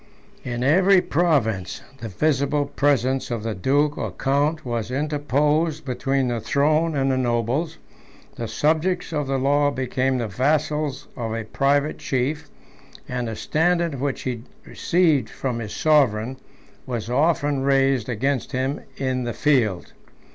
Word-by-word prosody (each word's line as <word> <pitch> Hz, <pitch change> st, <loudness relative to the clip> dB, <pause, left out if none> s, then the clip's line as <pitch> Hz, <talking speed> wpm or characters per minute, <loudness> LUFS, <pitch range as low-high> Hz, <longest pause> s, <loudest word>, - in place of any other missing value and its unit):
In 120 Hz, 0 st, -3 dB
every 185 Hz, +7 st, +5 dB
province, 140 Hz, -, 0 dB, 0.2 s
the 115 Hz, -, -5 dB
visible 140 Hz, +6 st, +1 dB
presence 135 Hz, -2 st, +1 dB
of 115 Hz, -3 st, -3 dB
the 115 Hz, -1 st, -2 dB
duke 145 Hz, +10 st, +1 dB
or -, -, -2 dB
count 145 Hz, +3 st, 0 dB
was 120 Hz, -2 st, -3 dB
interposed 150 Hz, +2 st, 0 dB
between 135 Hz, +1 st, 0 dB
the 120 Hz, -1 st, -1 dB
throne 150 Hz, +7 st, +1 dB
and 135 Hz, -1 st, +1 dB
the 130 Hz, -, +1 dB
nobles; 125 Hz, +7 st, -1 dB, 0.6 s
the 115 Hz, -, -5 dB
subjects 160 Hz, -, 0 dB
of 150 Hz, -3 st, -1 dB
the 135 Hz, 0 st, 0 dB
law 145 Hz, +2 st, +2 dB
became 130 Hz, -1 st, -1 dB
the 120 Hz, -2 st, -2 dB
vassals 150 Hz, +5 st, -1 dB
of 115 Hz, -2 st, -3 dB
a 115 Hz, -, -3 dB
private 140 Hz, +6 st, 0 dB
chief; 145 Hz, +4 st, -2 dB, 0.6 s
and 125 Hz, -1 st, -3 dB
the 110 Hz, -, -4 dB
standard 165 Hz, 0 st, 0 dB
which 140 Hz, -2 st, -2 dB
he 125 Hz, -3 st, -3 dB, 0.2 s
received 160 Hz, -9 st, +1 dB
from 125 Hz, -3 st, -3 dB
his 110 Hz, -3 st, -6 dB
sovereign, 130 Hz, -5 st, +2 dB, 0.5 s
was 115 Hz, -4 st, -3 dB
often 145 Hz, +1 st, +1 dB
raised 135 Hz, -3 st, +2 dB
against 130 Hz, +3 st, -1 dB
him 130 Hz, +3 st, -1 dB, 0.2 s
in 130 Hz, -2 st, -1 dB
the 120 Hz, -1 st, -3 dB
field. 120 Hz, -, +1 dB
135 Hz, 140 wpm, -23 LUFS, 120-150 Hz, 0.6 s, every